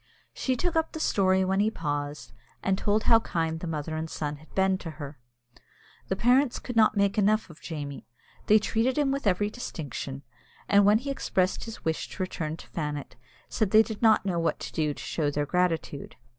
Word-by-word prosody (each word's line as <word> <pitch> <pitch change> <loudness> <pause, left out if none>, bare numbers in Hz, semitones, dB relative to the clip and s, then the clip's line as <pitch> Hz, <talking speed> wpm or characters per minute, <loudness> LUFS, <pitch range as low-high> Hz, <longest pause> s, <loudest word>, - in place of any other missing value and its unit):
She 260 - -1
took 345 +6 -1
up 320 0 +1
the 315 - -5
story 190 -8 +2
when 190 +1 +1
he 210 +2 +3
paused, 145 -5 -4 0.3
and 190 - +2
told 210 +2 +1
how 230 -1 +6
kind 165 -6 -2
the 175 - -5
mother 155 0 -3
and 160 +1 -3
son 150 -2 -3
had 155 +2 -19
been 190 -1 +2
to 165 - -6
her. 145 -2 -8 0.9
The 190 - 0
parents 250 +5 +3
could 245 - -6
not 215 -1 +4
make 200 +1 +2
enough 210 -2 +2
of 155 - -16
Jamie. 145 -4 -6 0.4
They 215 - +7
treated 225 +5 0
him 285 -2 +2
with 275 -4 -1
every 205 +2 +2
distinction, 140 - -6 0.4
and 200 0 +5
when 210 +1 +6
he 275 +4 -4
expressed 185 -8 0
his 225 -1 -9
wish 160 -1 -1
to 185 - -2
return 160 -4 -4
to - - -13
Fannet, 150 -3 -4 0.3
said 215 -4 0
they 220 +2 +7
did 220 -2 -7
not 220 -3 +5
know 180 -3 0
what 165 - 0
to - - -6
do 150 -2 0
to - - -8
show 150 -3 -1
their 145 0 -1
gratitude. 165 -3 -1
190 Hz, 205 wpm, -27 LUFS, 155-220 Hz, 0.9 s, They